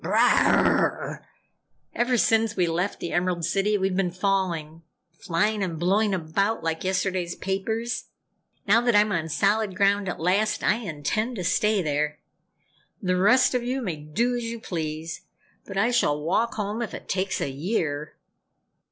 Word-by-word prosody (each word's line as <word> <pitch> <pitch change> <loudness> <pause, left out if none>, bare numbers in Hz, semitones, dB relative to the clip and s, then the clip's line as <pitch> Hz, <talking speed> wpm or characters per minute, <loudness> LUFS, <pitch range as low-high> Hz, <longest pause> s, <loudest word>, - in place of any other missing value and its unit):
Brrrrah! - - +3 0.7
Ever 245 +1 +1
since 225 -1 +2
we 180 - +2
left 175 +4 -1
the 170 - -4
Emerald 175 -1 0
City 205 +4 +1
we've 190 -1 0
been 190 -1 +1
falling 175 -4 -1 0.3
flying 185 +5 -1
and 175 -4 -2
blowing 200 +6 +2
about 195 +5 -1
like 165 0 -2
yesterday's 185 -2 -1
papers. 225 +5 -2 0.6
Now 220 +4 +5
that 240 -2 +2
I'm 210 0 +4
on 165 -4 -1
solid 205 +3 +1
ground 200 -1 +2
at - - -5
last, 195 +6 +1
I 215 - +3
intend 215 - -2
to 185 - -4
stay 210 +2 +2
there! 150 0 -1 0.8
The 185 -2 0
rest 235 +10 +4
of 250 - +1
you 255 +2 -2
may 175 -7 -3
do 220 +12 -1
as 240 - -3
you 230 0 -5
please, 160 -4 -5 0.5
but 195 - -6
I 230 +5 +2
shall 150 -11 +2
walk 185 +10 0
home 210 +2 -3
if 230 - -4
it - - -10
takes 190 +1 -1
a 140 - -2
year!" 150 -1 -2
195 Hz, 160 wpm, -25 LUFS, 170-220 Hz, 0.8 s, Now